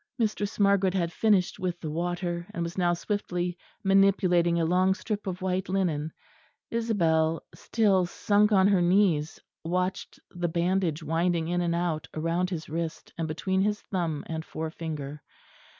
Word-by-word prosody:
Mistress 215 -3 -1
Margaret 200 -2 +3
had 170 -3 0
finished 205 -4 +2
with 180 -2 -2
the 155 -4 -5
water; 175 +1 -2
and 170 - -1
was 170 +2 -5
now 175 -2 +2
swiftly 180 -2 -2 0.3
manipulating 190 -3 +4
a 165 - +2
long 185 +3 +3
strip 210 -1 -4
of 185 0 -4
white 185 0 -1
linen. 165 -5 0 0.6
Isabel 165 -9 +1
still 195 -5 +2
sunk 210 +4 +2
on 195 -2 +5
her 195 -3 +3
knees 175 -4 +2 0.2
watched 180 +3 -2
the 175 -1 -2
bandage 170 -1 0
winding 165 +1 0
in 175 0 +1
and 170 -1 0
out 170 -3 -1
round 165 +3 0
his 165 -4 -5
wrist, 165 +1 -4
and 165 -1 -2
between 190 +5 -1
his 210 +1 +1
thumb 170 -6 -3
and 160 -1 -4
forefinger. 155 -3 -5
175 Hz, 150 wpm, -27 LUFS, 165-190 Hz, 0.6 s, on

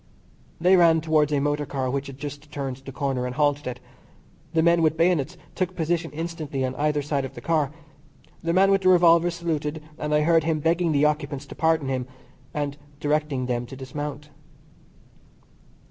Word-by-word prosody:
They 180 +3 +5
ran 165 -2 +5
towards 155 -2 +2
a 145 - +2
motor 145 0 -1
car 135 -2 -2
which 140 +1 -2
had 135 -1 -9
just 145 +1 -8
turned 135 -3 -4
the 135 0 -10
corner, 135 -2 -2
and 125 - -5
halted 145 -1 +1
it. 125 -1 -4 0.7
The 160 -1 +2
men 170 0 +4
with 160 0 +2
bayonets 170 -1 +1 0.2
took 185 0 -2
position 165 0 -1
instantly 155 -4 -3
on 130 - -3
either 150 +2 0
side 140 -1 -1
of 135 - -7
the - - -7
car. 150 -1 +1 0.7
The 170 - -1
man 190 +3 +4
with 195 0 +3
the 185 - +4
revolver 175 -1 +6
saluted, 160 -3 -2 0.2
and 150 - -3
I 150 0 +4
heard 165 +1 +4
him 160 -1 0
begging 165 +2 +1
the 145 0 +3
occupants 145 -2 -1
to - - -10
pardon 160 -3 +2
him, 130 -1 -2 0.4
and 145 -1 -3 0.2
directing 150 -3 0
them 120 -1 -2
to 135 - -9
dismount. 145 +2 -6
150 Hz, 185 wpm, -25 LUFS, 140-165 Hz, 0.7 s, revolver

